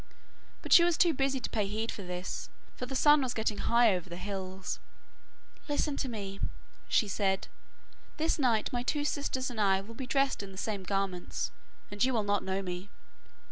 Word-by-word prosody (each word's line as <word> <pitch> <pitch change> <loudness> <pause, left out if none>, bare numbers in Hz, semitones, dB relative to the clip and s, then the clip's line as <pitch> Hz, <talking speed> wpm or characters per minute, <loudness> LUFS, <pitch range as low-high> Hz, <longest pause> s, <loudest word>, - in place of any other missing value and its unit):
But - - +3
she 340 - +10
was 345 -1 +3
too 345 -3 +5
busy 270 -1 +1
to - - -4
pay 210 -3 0
heed 220 +3 -2
to - - -4
this, 180 0 -5 0.3
for 250 - -5
the 270 - -4
sun 295 +2 +6
was 255 -2 -1
getting 220 -2 0
high 235 -2 +5
over 180 0 -5
the 170 - -6
hills. 190 -1 -4 0.9
'Listen 290 0 +1
to 265 - -1
me,' 200 -4 -5 0.5
she 215 - +3
said. 195 -1 0 0.7
'This 320 0 +1
night 240 -5 +2
my 245 - 0
two 290 +4 0
sisters 265 -3 -1
and 220 -3 -2
I 195 -2 +4
will 205 +4 -9
be 255 +2 -6
dressed 275 -2 +2
in 200 -1 -8
the 190 - -11
same 205 0 -2
garments, 190 -1 -2 0.4
and 205 +2 0
you 260 0 +3
will 220 - +2
not 205 -1 +1
know 190 +1 -1
me. 180 +2 -5
215 Hz, 195 wpm, -31 LUFS, 195-260 Hz, 0.9 s, she